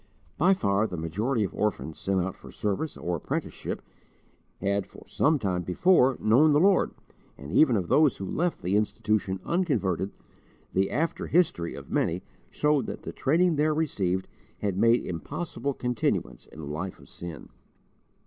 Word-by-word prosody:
By 185 Hz, +5 st, +4 dB
far 100 Hz, -, +1 dB
the 90 Hz, -, -6 dB
majority 105 Hz, +10 st, -1 dB
of 95 Hz, -, -3 dB
orphans 80 Hz, -8 st, -2 dB
sent 95 Hz, -1 st, 0 dB
out 95 Hz, +1 st, -2 dB
for -, -, -13 dB
service 105 Hz, +9 st, -2 dB
or 85 Hz, 0 st, -2 dB
apprenticeship, -, -, -4 dB, 0.8 s
had 100 Hz, 0 st, 0 dB
for 100 Hz, -, -14 dB
some 155 Hz, +1 st, +2 dB
time 95 Hz, -7 st, -1 dB
before 130 Hz, -, +3 dB
known 135 Hz, +8 st, +5 dB
the 145 Hz, -, +5 dB
Lord; 195 Hz, +3 st, +3 dB, 0.4 s
and 70 Hz, +2 st, -9 dB
even 130 Hz, -, +5 dB
of 95 Hz, -5 st, -1 dB
those 150 Hz, -, +4 dB
who 95 Hz, -, -5 dB
left 170 Hz, -, -1 dB
the 90 Hz, +3 st, +1 dB
Institution 105 Hz, -2 st, 0 dB
unconverted, 110 Hz, -, 0 dB, 0.6 s
the 95 Hz, +1 st, +2 dB
after 165 Hz, +2 st, -1 dB
history 150 Hz, -, +1 dB
of -, -, -10 dB
many 85 Hz, +3 st, 0 dB, 0.3 s
showed 150 Hz, -2 st, +1 dB
that -, -, -6 dB
the -, -, -6 dB
training 165 Hz, +4 st, +2 dB
there 155 Hz, +1 st, +2 dB
received 95 Hz, -, 0 dB, 0.3 s
had 100 Hz, -3 st, 0 dB
made 115 Hz, +4 st, +3 dB
impossible 135 Hz, -, -4 dB
continuance 125 Hz, -2 st, -2 dB
in 80 Hz, -, -11 dB
a -, -, -6 dB
life 80 Hz, +6 st, -4 dB
of -, -, -16 dB
sin. 85 Hz, -5 st, -8 dB
105 Hz, 160 wpm, -27 LUFS, 95-150 Hz, 0.8 s, known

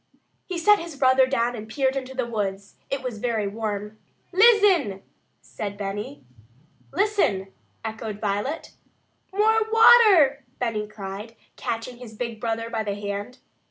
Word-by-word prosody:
He 365 Hz, -, -4 dB
set 415 Hz, +5 st, +5 dB
his 335 Hz, -2 st, -7 dB
brother 260 Hz, -1 st, +4 dB
down 245 Hz, -2 st, 0 dB
and 220 Hz, -1 st, -8 dB
peered 265 Hz, +3 st, 0 dB
into 265 Hz, -1 st, -5 dB
the 255 Hz, -2 st, -1 dB
woods. 200 Hz, -4 st, -4 dB, 0.2 s
It 275 Hz, -1 st, -3 dB
was 245 Hz, -4 st, -4 dB
very 220 Hz, -3 st, -1 dB
warm. 210 Hz, 0 st, -4 dB, 0.3 s
"Lizzen!" 380 Hz, -, +4 dB, 0.4 s
said 205 Hz, -2 st, -6 dB
Benny. 195 Hz, -8 st, -5 dB, 0.7 s
"Listen!" 310 Hz, -, 0 dB, 0.3 s
echoed 220 Hz, -1 st, -5 dB
Violet. 210 Hz, +9 st, -2 dB, 0.6 s
"More 435 Hz, +3 st, +3 dB
water!" 420 Hz, -, +6 dB
Benny 220 Hz, -4 st, -2 dB
cried, 210 Hz, +2 st, -8 dB, 0.2 s
catching 230 Hz, +2 st, -4 dB
his 240 Hz, -3 st, -11 dB
big 235 Hz, -2 st, -5 dB
brother 230 Hz, -1 st, -2 dB
by 230 Hz, -1 st, -2 dB
the 200 Hz, -2 st, -3 dB
hand. 205 Hz, +4 st, -5 dB
230 Hz, 135 wpm, -24 LUFS, 210-275 Hz, 0.7 s, water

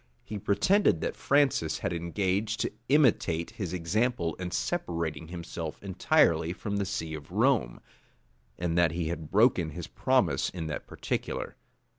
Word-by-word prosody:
He 105 Hz, -1 st, -6 dB
pretended 105 Hz, -, +3 dB
that -, -, -2 dB
Francis 135 Hz, -, +2 dB
had -, -, -2 dB
engaged 95 Hz, +5 st, -1 dB
to -, -, -1 dB, 0.2 s
imitate 115 Hz, -, +3 dB
his 95 Hz, -6 st, -5 dB
example 90 Hz, +1 st, 0 dB
in 90 Hz, -1 st, -4 dB
separating 80 Hz, +4 st, -2 dB
himself 85 Hz, -2 st, -6 dB
entirely 85 Hz, -3 st, +2 dB
from 100 Hz, +2 st, -3 dB
the 100 Hz, -, 0 dB
see 80 Hz, -2 st, -3 dB
of 75 Hz, -2 st, -8 dB
Rome, -, -, +2 dB, 0.8 s
and 85 Hz, -1 st, -1 dB
that 85 Hz, -2 st, +3 dB
he 85 Hz, -2 st, -2 dB
had 80 Hz, -3 st, -5 dB
broken 105 Hz, -6 st, +4 dB
his 75 Hz, -, -6 dB
promise -, -, +1 dB
in 85 Hz, -3 st, -5 dB
that 75 Hz, -1 st, -5 dB
particular. -, -, -3 dB
85 Hz, 145 wpm, -29 LUFS, 80-100 Hz, 0.8 s, broken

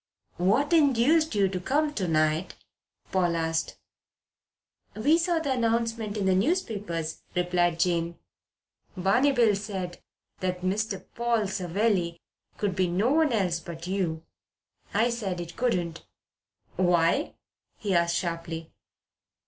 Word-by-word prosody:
"What 230 Hz, -, +2 dB
induced 305 Hz, 0 st, +4 dB
you 200 Hz, -1 st, +4 dB
to 185 Hz, -1 st, -3 dB
come 295 Hz, +9 st, 0 dB
to 190 Hz, -9 st, -2 dB
night?" 155 Hz, +2 st, +1 dB, 0.6 s
Paul 175 Hz, -3 st, +2 dB
asked. 165 Hz, 0 st, -1 dB, 1.2 s
"We 295 Hz, +10 st, +3 dB
saw 345 Hz, 0 st, +1 dB
the 315 Hz, -4 st, -1 dB
announcement 230 Hz, -3 st, 0 dB
in 200 Hz, -, -1 dB
the 190 Hz, -, +4 dB
newspapers," 200 Hz, -, -1 dB
replied 175 Hz, -1 st, +1 dB
Jane. 170 Hz, -1 st, 0 dB, 0.8 s
"Barney 200 Hz, +10 st, +3 dB
Bill 235 Hz, -6 st, +4 dB
said 195 Hz, -3 st, -5 dB, 0.4 s
the 185 Hz, -1 st, 0 dB
Mr. 190 Hz, +2 st, -2 dB
Paul 235 Hz, -2 st, +1 dB
Savelli 185 Hz, -1 st, 0 dB, 0.4 s
could 200 Hz, -3 st, -1 dB
be 185 Hz, -1 st, +2 dB
no 195 Hz, +9 st, +1 dB
one 315 Hz, -1 st, +3 dB
else 185 Hz, -7 st, +1 dB
but 170 Hz, 0 st, -8 dB
you. 180 Hz, -4 st, -2 dB, 0.7 s
I 225 Hz, +4 st, +2 dB
said 200 Hz, -6 st, -3 dB
it 170 Hz, -1 st, -7 dB
couldn't." 175 Hz, -9 st, -1 dB, 0.7 s
"Why?" 175 Hz, -, +2 dB, 0.4 s
he 205 Hz, -3 st, -2 dB
asked 170 Hz, -1 st, +2 dB
sharply. 165 Hz, -2 st, -4 dB
190 Hz, 125 wpm, -27 LUFS, 175-235 Hz, 1.2 s, induced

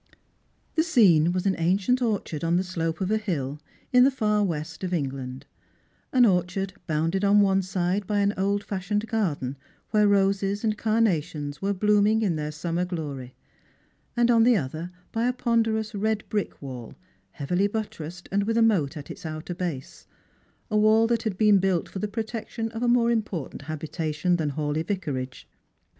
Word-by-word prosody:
The 320 Hz, -, +3 dB
scene 185 Hz, -, +5 dB
was 185 Hz, +1 st, -2 dB
an 195 Hz, -1 st, +2 dB
ancient 195 Hz, +9 st, +2 dB
orchard 205 Hz, -10 st, -1 dB
on 165 Hz, +1 st, +2 dB
the 185 Hz, -, +1 dB
slope 165 Hz, -2 st, -3 dB
of 190 Hz, +2 st, 0 dB
a 220 Hz, -, +2 dB
hill, 150 Hz, -9 st, -3 dB, 0.3 s
in 250 Hz, 0 st, +7 dB
the 265 Hz, -, +6 dB
far 210 Hz, -5 st, +1 dB
west 160 Hz, -2 st, -4 dB
of 180 Hz, -1 st, -1 dB
England: 130 Hz, -3 st, -4 dB, 0.7 s
an 250 Hz, -2 st, +5 dB
orchard 185 Hz, 0 st, 0 dB
bounded 165 Hz, +5 st, 0 dB
on 205 Hz, +1 st, +5 dB
one 195 Hz, -1 st, +3 dB
side 185 Hz, +1 st, -1 dB
by 205 Hz, -1 st, +1 dB
an 200 Hz, 0 st, +2 dB
old 200 Hz, +2 st, 0 dB
fashioned 205 Hz, +2 st, -2 dB
garden, 150 Hz, -, -1 dB, 0.3 s
where 210 Hz, -1 st, +4 dB
roses 200 Hz, +1 st, +2 dB
and 215 Hz, -1 st, +1 dB
carnations 165 Hz, -10 st, 0 dB
were 200 Hz, +1 st, 0 dB
blooming 210 Hz, +2 st, +3 dB
in 185 Hz, -6 st, +1 dB
their 150 Hz, 0 st, -3 dB
summer 165 Hz, +3 st, -2 dB
glory; 145 Hz, -8 st, -5 dB, 0.8 s
and 240 Hz, 0 st, +4 dB
on 230 Hz, -1 st, +5 dB
the 240 Hz, -1 st, +5 dB
other 160 Hz, +3 st, -4 dB, 0.2 s
by 230 Hz, +2 st, 0 dB
a 250 Hz, -, +1 dB
ponderous 225 Hz, -3 st, 0 dB
red 215 Hz, +1 st, 0 dB
brick 210 Hz, -2 st, -2 dB
wall, 125 Hz, -4 st, -8 dB, 0.4 s
heavily 180 Hz, +7 st, 0 dB
buttressed, 180 Hz, -5 st, -5 dB
and 200 Hz, +1 st, +1 dB
with 225 Hz, +1 st, 0 dB
a 230 Hz, -, +5 dB
moat 170 Hz, -11 st, +2 dB
at 145 Hz, -, -8 dB
its -, -, -10 dB
outer 155 Hz, +2 st, -5 dB
base 170 Hz, -7 st, -5 dB, 0.3 s
— -, -, -37 dB
a 215 Hz, -, +2 dB
wall 215 Hz, +1 st, +5 dB
that 230 Hz, 0 st, +1 dB
had 215 Hz, -5 st, -3 dB
been 210 Hz, -2 st, +5 dB
built 185 Hz, -3 st, +1 dB
for 190 Hz, -, -7 dB
the 210 Hz, -, -1 dB
protection 225 Hz, +1 st, -4 dB
of 225 Hz, 0 st, -6 dB
a 245 Hz, -, +1 dB
more 240 Hz, -1 st, +4 dB
important 205 Hz, -, -3 dB
habitation 155 Hz, +3 st, -2 dB
than 155 Hz, -3 st, -1 dB
Hawleigh 150 Hz, +1 st, -1 dB
Yicarage. 140 Hz, -10 st, -4 dB
190 Hz, 180 wpm, -26 LUFS, 160-215 Hz, 0.8 s, in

